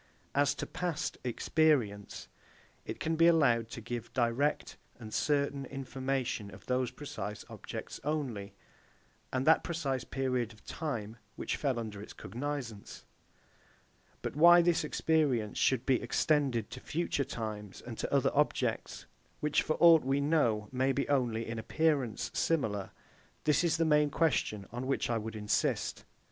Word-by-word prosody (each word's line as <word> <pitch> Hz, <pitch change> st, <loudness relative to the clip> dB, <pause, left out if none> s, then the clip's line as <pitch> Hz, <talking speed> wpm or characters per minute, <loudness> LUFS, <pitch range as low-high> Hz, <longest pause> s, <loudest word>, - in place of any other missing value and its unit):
As 140 Hz, 0 st, +3 dB
to -, -, -4 dB
past 180 Hz, -3 st, -3 dB
Experience, 125 Hz, -5 st, +1 dB, 0.6 s
it -, -, -6 dB
can 160 Hz, 0 st, 0 dB
be 165 Hz, +1 st, +5 dB
allowed 120 Hz, -9 st, +4 dB
to 115 Hz, -, -7 dB
give 120 Hz, 0 st, -5 dB
direct 125 Hz, +4 st, 0 dB, 0.2 s
and 110 Hz, -2 st, -9 dB
certain 140 Hz, -1 st, +1 dB
information 130 Hz, -5 st, -3 dB
of -, -, -13 dB
those 125 Hz, -1 st, 0 dB
precise 105 Hz, -8 st, -6 dB
objects -, -, -7 dB
only, 125 Hz, -10 st, -3 dB, 0.8 s
and 130 Hz, +1 st, -1 dB
that 160 Hz, +1 st, +5 dB
precise 140 Hz, -7 st, -2 dB
period 125 Hz, -3 st, -1 dB
of 105 Hz, -, -21 dB
time, 115 Hz, -9 st, -4 dB, 0.2 s
which -, -, -2 dB
fell 135 Hz, -4 st, -1 dB
under 110 Hz, -3 st, -5 dB
its 105 Hz, -, -9 dB
cognizance: 125 Hz, -4 st, -6 dB, 1.2 s
but -, -, -3 dB
why 175 Hz, +3 st, +8 dB
this 170 Hz, -2 st, +2 dB
experience 150 Hz, -8 st, +1 dB
should 130 Hz, -3 st, +2 dB
be 130 Hz, -3 st, +3 dB
extended 125 Hz, -3 st, +1 dB
to 130 Hz, -, -7 dB
future 155 Hz, 0 st, -1 dB
times, 110 Hz, -6 st, -6 dB
and -, -, -8 dB
to -, -, -3 dB
other -, -, +3 dB
objects, -, -, 0 dB, 0.3 s
which 150 Hz, -1 st, +2 dB
for 155 Hz, -, -1 dB
aught 165 Hz, -2 st, +8 dB
we 135 Hz, +2 st, +1 dB
know, 140 Hz, -8 st, +2 dB
may 130 Hz, +1 st, +1 dB
be 140 Hz, +1 st, -1 dB
only 120 Hz, -5 st, +1 dB
in 115 Hz, 0 st, -4 dB
appearance 140 Hz, -2 st, 0 dB
similar; 110 Hz, -12 st, 0 dB, 0.5 s
this 150 Hz, +3 st, +3 dB
is 165 Hz, -2 st, +2 dB
the 165 Hz, -, +2 dB
main 150 Hz, -1 st, +4 dB
question 135 Hz, -10 st, 0 dB
on 125 Hz, +3 st, -4 dB
which 135 Hz, -2 st, 0 dB
I 115 Hz, -, +1 dB
would 110 Hz, +1 st, -6 dB
insist. 105 Hz, -1 st, -1 dB
130 Hz, 150 wpm, -32 LUFS, 115-150 Hz, 1.2 s, why